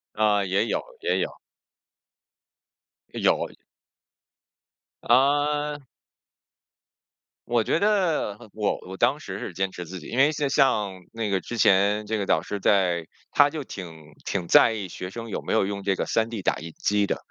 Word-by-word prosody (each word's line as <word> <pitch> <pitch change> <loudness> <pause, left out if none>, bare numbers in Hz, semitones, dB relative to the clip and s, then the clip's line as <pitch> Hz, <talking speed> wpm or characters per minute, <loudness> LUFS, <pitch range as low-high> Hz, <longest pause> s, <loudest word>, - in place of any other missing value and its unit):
啊， 105 -2 +3
也 95 +3 +1
有， - - -1 0.2
也 445 - +1
有。 - - -1 1.8
有。 - - +1 1.5
啊。 145 +3 +2 1.7
我 120 -1 +2
觉 160 - +1
得 180 - +1 0.2
我 105 -2 0
我 95 - -7
当 130 +7 +2
时 100 -9 -7
是 - - -5
坚 95 +2 -1
持 90 -1 -7
自 90 +2 -8
己， - - -11
因 120 - -5
为 140 +3 +6
那 145 - +1
像 105 -9 +1
那 115 -2 -3
个 95 -1 +1
之 120 - -6
前 105 +1 +3
这 110 +1 -1
个 100 - -2
导 80 -4 +2
师 100 +3 -5
在 90 -4 +2 0.3
他 145 0 +5
就 155 -2 -5
挺 80 - -10
挺 90 -4 -2
在 115 - +6
意 100 -4 -4
学 90 +1 -7
生 115 +4 -7
有 - - -3
没 - - -5
有 - - +3
用 100 0 -4
这 95 0 +1
个 - - -2
3D 115 -2 -1
打 - - +1
印 80 +1 -8
机 105 -1 +1
的。 - - -1
105 Hz, 175 characters per minute, -25 LUFS, 95-125 Hz, 1.8 s, 为